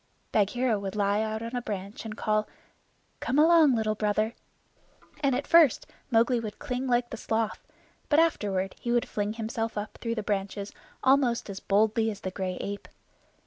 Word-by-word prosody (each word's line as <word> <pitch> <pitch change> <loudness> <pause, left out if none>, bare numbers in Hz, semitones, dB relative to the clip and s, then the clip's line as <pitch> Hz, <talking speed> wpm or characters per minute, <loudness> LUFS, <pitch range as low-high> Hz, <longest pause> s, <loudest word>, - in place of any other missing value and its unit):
Bagheera 220 +2 +2
would 195 0 -5
lie 205 0 +2
out 220 0 -2
on 230 +2 -5
a 245 - -1
branch 200 -1 -6
and 215 0 -6
call, 215 0 0 0.7
"Come 260 - -1
along, 315 -3 +6
Little 220 -1 +1
Brother," 215 +1 0 0.9
and 275 -3 +2
at 275 +3 -2
first 330 -7 +5 0.2
Mowgli 235 0 +3
would 215 -2 -6
cling 260 -2 -3
like 240 -1 +1
the 230 - -5
sloth, 220 0 -1 0.5
but 295 - +4
afterward 200 - +1
he 235 - -3
would 240 0 +2
fling 205 0 -2
himself 225 0 -3 0.2
through 230 -1 -2
the 215 - -3
branches 200 0 -2 0.3
almost 260 -5 +3
as 195 - -6
boldly 220 +2 +2
as 205 -2 -6
the 185 - -4
gray 185 -1 -3
ape. 200 0 -5
220 Hz, 170 wpm, -28 LUFS, 205-245 Hz, 0.9 s, along